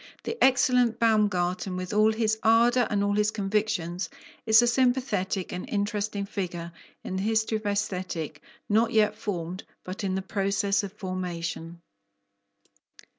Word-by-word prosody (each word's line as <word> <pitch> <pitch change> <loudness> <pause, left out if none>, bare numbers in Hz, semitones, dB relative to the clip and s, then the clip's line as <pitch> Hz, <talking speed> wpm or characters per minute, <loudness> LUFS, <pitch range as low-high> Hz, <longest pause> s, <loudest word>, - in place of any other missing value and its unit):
The 455 - -3
excellent 250 -3 +4
Baumgarten, 190 -5 +1
with 185 +2 -4
all 215 +1 +4
his 220 -1 0
ardour 235 +2 +4
and 205 -2 +1
all 205 0 +1
his 210 +1 +2
convictions, 195 -4 -1 0.4
is 220 +2 +7
a - - +4
sympathetic 240 -7 +1
and 180 - -5
interesting 205 0 -1
figure 175 -4 -4 0.3
in 190 - -4
the - - -1
history 220 +1 +1
of 215 -1 -6
Aesthetic 185 -5 -3 0.3
not 220 +2 +2
yet 215 -1 +4
formed, 185 -4 -4 0.2
but 185 +3 -6
in 190 -1 0
process 200 +1 0
of 200 -2 -6
formation. 175 -4 -5
205 Hz, 135 wpm, -27 LUFS, 185-220 Hz, 0.4 s, is